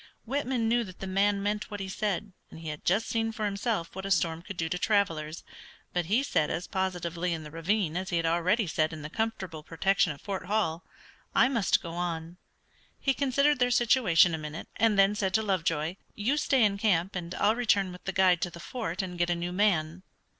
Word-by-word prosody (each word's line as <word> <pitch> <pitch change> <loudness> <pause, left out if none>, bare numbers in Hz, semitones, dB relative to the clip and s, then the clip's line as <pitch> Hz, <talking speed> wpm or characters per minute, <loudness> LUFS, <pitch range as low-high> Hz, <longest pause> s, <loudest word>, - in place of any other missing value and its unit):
Whitman 255 -2 -1
knew 240 +1 +2
that 185 -2 -12
the - - -5
man 195 +1 +1
meant 210 +1 -1
what 205 -1 -6
he 195 - -4
said, 200 0 -2 0.2
and - - -11
he 160 - -5
had 150 -1 -6
just 200 +6 +2
seen 225 -1 0
for 220 -1 -3
himself 200 -4 -2
what 190 - -5
a 195 - -4
storm 165 -2 +1
could 190 +1 -8
do 165 - -1
to 180 +2 -2
travelers, 165 -7 0 0.5
but 175 -1 0
he 225 +8 +2
said 155 - +1
as 175 - -2
positively 180 -2 -2
in 160 - -7
the 150 - -10
ravine 165 +1 0
as 185 +1 -2
he 175 - 0
had 165 - 0
already 175 +7 +2
said 155 -1 0
in 155 -2 -7
the 150 - -7
comfortable 190 -8 -3
protection 175 +3 +1
of 145 - -8
Fort 195 -3 -5
Hall, 185 -5 0 0.5
"I - - +5
must 230 -7 +2
go 170 - -6
on." 170 -1 -4 0.6
He 270 - +2
considered 280 +1 +2
their 245 0 +3
situation 225 -9 +4
a 160 - -2
minute, 150 +1 -7
and 225 -3 +3
then 195 +1 +5
said 195 -2 -1
to 220 - +3
Lovejoy, 165 -3 0 0.2
"You 225 +7 +1
stay 270 -4 +3
in 200 -1 0
camp, 190 -3 +1
and 175 -1 -4
I'll 210 +2 +3
return 205 -6 +2
with 180 - -12
the 195 - -1
guide 185 -2 +4
to 175 - 0
the 170 - -11
fort 200 -4 -4
and 180 -2 -6
get 175 0 +2
a 175 - +2
new 175 +1 -3
man." 180 -4 +1
190 Hz, 225 wpm, -29 LUFS, 170-215 Hz, 0.6 s, I